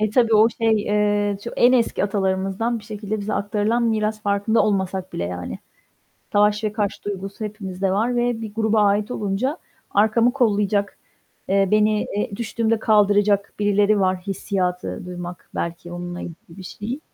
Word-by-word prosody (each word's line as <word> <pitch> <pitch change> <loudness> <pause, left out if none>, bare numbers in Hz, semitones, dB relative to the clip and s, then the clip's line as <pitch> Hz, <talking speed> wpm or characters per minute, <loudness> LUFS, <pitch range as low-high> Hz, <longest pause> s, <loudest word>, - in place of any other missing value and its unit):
E, 215 -1 +1
tabii, 230 -1 +3
o 215 +1 +6
şey, 225 -2 +1
eee, 205 -1 +1
ço 235 - -4
en 245 +1 +5
eski 235 -5 +2
atalarımızdan 195 +3 -1
bir 210 - -14
şekilde 210 0 -4
bize 205 +1 -3
aktarılan 210 +3 0
miras, 215 -2 0
farkında 205 +2 +2
olmasak 190 -2 -1
bile, 85 - -3
yani. 90 0 -5 0.7
Savaş 210 +1 +3
ve 210 - 0
kaç 210 -2 -2
duygusu 200 +1 -5
hepimizde 195 -3 -3
var 230 +5 +1
ve 240 -1 0
bir 215 -2 -7
gruba 220 -1 +2
ait 205 +2 +2
olunca, 220 - -1 0.3
"Arkamı 220 +4 +3
kollayacak." 205 -5 +1 0.5
eee, 195 0 +3
"Beni 215 0 +3
eee, 205 -1 -2
düştüğümde 230 0 0
kaldıracak 205 -2 +3
birileri 205 0 +3
var." 185 -1 +2
hissiyatı 180 -2 -2
duymak, 175 0 -8
belki 170 +1 -4
onunla 175 0 -6
ilgili 165 - -7 0.2
bir - - -8
şey. 220 +8 -6
205 Hz, 160 wpm, -22 LUFS, 195-220 Hz, 0.7 s, o